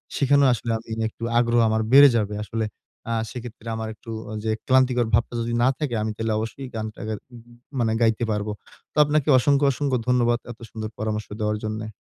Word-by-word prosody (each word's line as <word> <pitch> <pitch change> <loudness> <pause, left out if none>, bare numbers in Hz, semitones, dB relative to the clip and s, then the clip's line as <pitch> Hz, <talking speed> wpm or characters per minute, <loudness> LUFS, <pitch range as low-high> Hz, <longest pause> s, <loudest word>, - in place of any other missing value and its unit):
সেখানেও 140 0 +4
আসলে 115 0 -3
আমি 110 - -13 0.2
একটু 115 - -12
আগ্রহ 120 0 +3
আমার 110 0 +1
বেড়ে 140 +1 +9
যাবে। 105 -1 -1
আসলে 110 +2 -2 0.5
আ - - +1 0.2
সেক্ষেত্রে 120 -2 -9
আমার 110 0 -4
একটু 115 +1 -11 0.2
অ - - -6
যে 110 - 0 0.2
ক্লান্তিকর 130 -2 +3
ভাবটা 115 +2 +2
যদি 115 +1 -2
না - - +5
থাকে, 145 -4 -2
আমি 110 0 -1
তাহলে 110 0 -1
অবশ্যই 115 +5 -5
গানটা 110 -1 -5
গা 110 - -2 0.2
উ - - -10 0.4
মনে 115 -2 +1
গাইতে 115 +1 +2
পারবো। 105 0 -2 0.4
তো - - -12
আপনাকে 150 0 +1
অসংখ্য, 140 +2 +3
অসংখ্য 135 -1 0
ধন্যবাদ 120 -1 +3
এত 120 - -12
সুন্দর 110 -1 -5
পরামর্শ 110 0 -3
দেওয়ার 105 0 0
জন্যে। 110 0 -4
115 Hz, 195 wpm, -24 LUFS, 110-125 Hz, 0.5 s, বেড়ে